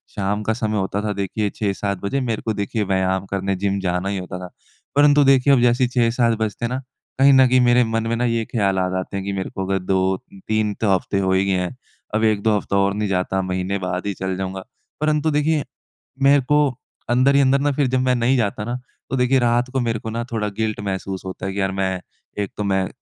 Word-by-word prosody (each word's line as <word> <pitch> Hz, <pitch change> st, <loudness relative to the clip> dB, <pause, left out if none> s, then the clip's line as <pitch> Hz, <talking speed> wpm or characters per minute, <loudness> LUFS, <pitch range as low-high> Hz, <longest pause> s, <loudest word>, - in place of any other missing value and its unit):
शाम 105 Hz, +1 st, -1 dB
का 110 Hz, -, 0 dB
समय 110 Hz, -2 st, -2 dB
होता 95 Hz, +1 st, -1 dB
था 105 Hz, -, -1 dB
देखिए 100 Hz, +1 st, -2 dB
6-7 100 Hz, -1 st, -2 dB
बजे 135 Hz, +7 st, -1 dB
मेरे 115 Hz, -4 st, -2 dB
को 110 Hz, -, -2 dB
देखिए 105 Hz, +2 st, -2 dB
व्यायाम 95 Hz, 0 st, 0 dB
करने 95 Hz, 0 st, -1 dB
जिम 100 Hz, +1 st, -1 dB
जाना 90 Hz, 0 st, -1 dB
ही 100 Hz, -, -2 dB
होता 90 Hz, -1 st, -6 dB
था। 90 Hz, -1 st, -8 dB, 0.5 s
परंतु 145 Hz, 0 st, +6 dB
देखिए 135 Hz, 0 st, +5 dB
अब 125 Hz, -, +4 dB
जैसे 120 Hz, +1 st, +3 dB
6-7 120 Hz, -2 st, +2 dB
बजते 110 Hz, +1 st, -2 dB
हैं -, -, -1 dB
ना 130 Hz, -, -3 dB, 0.4 s
कहीं 135 Hz, +1 st, +7 dB
न 130 Hz, -1 st, +6 dB
कहीं 125 Hz, +1 st, +4 dB
मेरे 120 Hz, 0 st, +5 dB
मन 115 Hz, 0 st, -1 dB
में 115 Hz, -, 0 dB
ना 120 Hz, -, 0 dB
ये 115 Hz, -1 st, 0 dB
ख़्याल 100 Hz, -5 st, 0 dB
आ 90 Hz, -, +1 dB
जाते 95 Hz, +1 st, -4 dB
हैं 95 Hz, -, -3 dB
कि 100 Hz, -, -2 dB
मेरे 95 Hz, -1 st, -3 dB
को 95 Hz, -, -4 dB
अगर 95 Hz, 0 st, 0 dB
2-3 95 Hz, +3 st, -1 dB
तो 110 Hz, -, +2 dB
हफ़्ते 95 Hz, +1 st, 0 dB
हुए 95 Hz, -1 st, +2 dB
ही 100 Hz, 0 st, 0 dB
हैं 90 Hz, +4 st, -1 dB, 0.4 s
अब 110 Hz, -, +1 dB
1-2 110 Hz, 0 st, +2 dB
हफ्ता 100 Hz, -, -3 dB
और 100 Hz, 0 st, +2 dB
नहीं 105 Hz, 0 st, -1 dB
जाता 95 Hz, 0 st, 0 dB
महीने 95 Hz, +1 st, -2 dB
बाद 90 Hz, +1 st, -3 dB
ही 100 Hz, -, -1 dB
चला 95 Hz, 0 st, -3 dB
जाऊँगा। 95 Hz, 0 st, -4 dB, 0.4 s
परंतु 155 Hz, 0 st, +1 dB
देखिए 150 Hz, 0 st, +1 dB, 0.6 s
मेरे 140 Hz, +1 st, +6 dB
को 150 Hz, 0 st, +5 dB, 0.5 s
अंदर 130 Hz, +3 st, +4 dB
ही 140 Hz, -, +6 dB
अंदर 135 Hz, 0 st, +3 dB
ना 145 Hz, +1 st, +1 dB
फ़िर 140 Hz, -1 st, +1 dB
जब 130 Hz, 0 st, +1 dB
मैं 125 Hz, -1 st, +2 dB
नहीं 120 Hz, +3 st, +2 dB
जाता 105 Hz, -2 st, -1 dB
ना 120 Hz, -, -3 dB, 0.3 s
तो 135 Hz, -, -1 dB
देखिए 125 Hz, +1 st, +3 dB
रात 120 Hz, +1 st, +1 dB
को 135 Hz, -, +1 dB
मेरे 115 Hz, -2 st, -1 dB
को 110 Hz, -, -6 dB
ना 115 Hz, +2 st, -3 dB
थोड़ा 105 Hz, -2 st, -1 dB
गिल्ट 110 Hz, -1 st, -1 dB
महसूस 95 Hz, -1 st, -4 dB
होता 95 Hz, 0 st, -6 dB
है 95 Hz, -, -3 dB
कि 100 Hz, -, -3 dB
यार 95 Hz, 0 st, 0 dB
मैं 95 Hz, -1 st, -1 dB, 0.4 s
एक 100 Hz, -, -6 dB
तो 105 Hz, -, -2 dB
मैं 95 Hz, -2 st, +1 dB
105 Hz, 235 wpm, -21 LUFS, 95-125 Hz, 0.6 s, कहीं